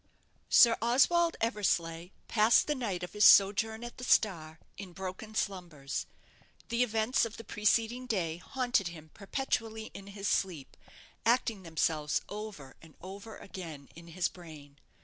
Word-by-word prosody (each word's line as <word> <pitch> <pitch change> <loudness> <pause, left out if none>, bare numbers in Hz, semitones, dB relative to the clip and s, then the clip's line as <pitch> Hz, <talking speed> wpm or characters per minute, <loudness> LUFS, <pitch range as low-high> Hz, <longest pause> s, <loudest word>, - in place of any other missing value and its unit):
Sir 230 -2 +7
Oswald 330 +9 +3
Eversleigh 175 -7 -1 0.2
passed 220 +1 +4
the 300 - 0
night 205 -10 -3
of 180 - -7
his 210 0 +1
sojourn 220 +4 +6
at 240 +1 -9
the - - -7
'Star' 165 -10 +1 0.2
in 190 -3 -9
broken 190 +4 -7
slumbers. 170 -10 -3 0.6
The 235 0 0
events 225 +2 +1
of 230 -1 -4
the 230 - -9
preceding 225 +4 0
day 170 -8 -1
haunted 245 0 -1
him 160 -2 -10
perpetually 220 0 -3
in 195 - -10
his 200 0 -5
sleep, 175 -10 -1 0.5
acting 230 -3 +1
themselves 160 -3 0
over 205 -10 -8
and 160 -2 -17
over 200 +4 -9
again 160 -8 -9
in 170 +1 -13
his 170 +1 -1
brain. 150 -5 -13
200 Hz, 145 wpm, -31 LUFS, 170-225 Hz, 0.6 s, Sir